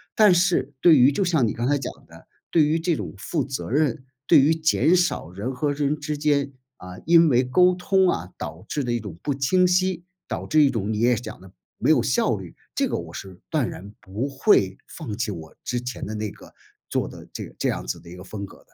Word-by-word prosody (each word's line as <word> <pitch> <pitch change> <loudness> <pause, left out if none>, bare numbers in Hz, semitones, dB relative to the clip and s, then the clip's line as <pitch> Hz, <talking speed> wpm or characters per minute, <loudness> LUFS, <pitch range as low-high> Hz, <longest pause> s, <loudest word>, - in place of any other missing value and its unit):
但 210 -4 +6
是 170 -6 +1
对 165 -4 +7
于 130 +3 +6
就 195 - 0
像 160 -10 +2
你 - - -2
刚 120 +2 -2
才 145 0 +2
讲 135 - -5 0.2
的， - - -16 0.2
对 160 -3 +5
于 155 +2 +1
这 170 -1 0
种 90 - -6
负 150 - -2
责 135 -3 -5
任， 135 -2 0 0.2
对 - - +7
于 150 +4 +4
减 160 +2 +3
少 175 - 0
人 105 +9 -5
和 145 +3 -1
人 145 +1 -1
之 150 0 -3
间， 140 -2 +1 0.2
嗯， 90 0 -10
因 165 -1 +6
为 125 0 +3
沟 180 +9 +4
通 190 +1 +2
啊， 90 - -2
导 - - -7
致 145 - -1
的 120 - -2
一 120 - 0
种 100 -6 -8
不 145 - 0
清 180 +7 +2
晰， 180 -1 +1 0.2
导 - - -4
致 155 0 +3
一 140 - +4
种 110 -4 -2
你 105 - -2
也 120 +1 +3
讲 110 -3 -7
的 95 -1 -14 0.3
没 - - 0
有 - - +4
效 - - +1
率， - - -10 0.2
这 - - +1
个 - - -2
我 85 0 -8
是 95 -1 -9
断 145 -7 0
然 100 +2 -9
不 110 +9 -4
会 130 - +2
放 115 -11 -7
弃 115 -3 -2
我 80 -4 -9
之 125 -1 -2
前 125 0 -5
的 110 - -5
那 105 -1 -3
个 - - -15 0.4
做 - - -1
的 - - -11
这 - - -5
这 - - 0
样 - - -4
子 60 - -3
的 85 - -18
一 90 - -10
个 90 - -10
风 100 0 -6
格 - - -14
的。 - - -27
135 Hz, 260 characters per minute, -24 LUFS, 105-160 Hz, 0.4 s, 对